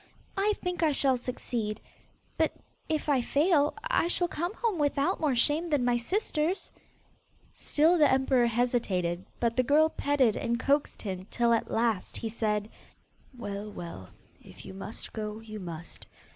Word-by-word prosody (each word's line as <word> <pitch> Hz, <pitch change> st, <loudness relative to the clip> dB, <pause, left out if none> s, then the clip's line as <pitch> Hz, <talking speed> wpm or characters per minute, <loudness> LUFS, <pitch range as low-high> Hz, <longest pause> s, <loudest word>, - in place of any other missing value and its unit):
I 410 Hz, +1 st, +2 dB
think 360 Hz, -1 st, -2 dB
I 310 Hz, -3 st, +3 dB
shall 270 Hz, -1 st, +3 dB
succeed, 240 Hz, -3 st, -3 dB, 0.6 s
but -, -, +2 dB, 0.4 s
if 310 Hz, -1 st, -1 dB
I 280 Hz, -4 st, +3 dB
fail, 295 Hz, +3 st, +2 dB
I -, -, +2 dB
shall 350 Hz, 0 st, +1 dB
come 345 Hz, +5 st, -3 dB
home 445 Hz, -8 st, -1 dB
without 285 Hz, -1 st, +1 dB
more 295 Hz, -5 st, +1 dB
shame 300 Hz, +8 st, +2 dB
than 285 Hz, -5 st, +2 dB
my 245 Hz, -1 st, +3 dB
sisters.' 340 Hz, -, -1 dB, 0.8 s
Still 325 Hz, +4 st, +3 dB
the 295 Hz, -, +6 dB
emperor 265 Hz, -2 st, +3 dB
hesitated, 215 Hz, -7 st, 0 dB, 0.2 s
but 230 Hz, -1 st, +1 dB
the 255 Hz, -, +4 dB
girl 300 Hz, +5 st, +4 dB
petted 280 Hz, -8 st, +2 dB
and 235 Hz, 0 st, -1 dB
coaxed 280 Hz, +2 st, 0 dB
him 190 Hz, -2 st, -5 dB
till 235 Hz, -1 st, +2 dB
at 230 Hz, -, 0 dB
last 225 Hz, -4 st, 0 dB
he 225 Hz, -, -3 dB
said, 210 Hz, -2 st, -1 dB, 0.7 s
'Well, 205 Hz, -2 st, -5 dB
well, 170 Hz, -, -8 dB, 0.3 s
if -, -, -14 dB
you -, -, -8 dB
must 195 Hz, +3 st, -6 dB
go, 215 Hz, -1 st, -4 dB
you 215 Hz, -1 st, -8 dB
must. 170 Hz, -3 st, -8 dB
250 Hz, 160 wpm, -29 LUFS, 215-300 Hz, 0.8 s, the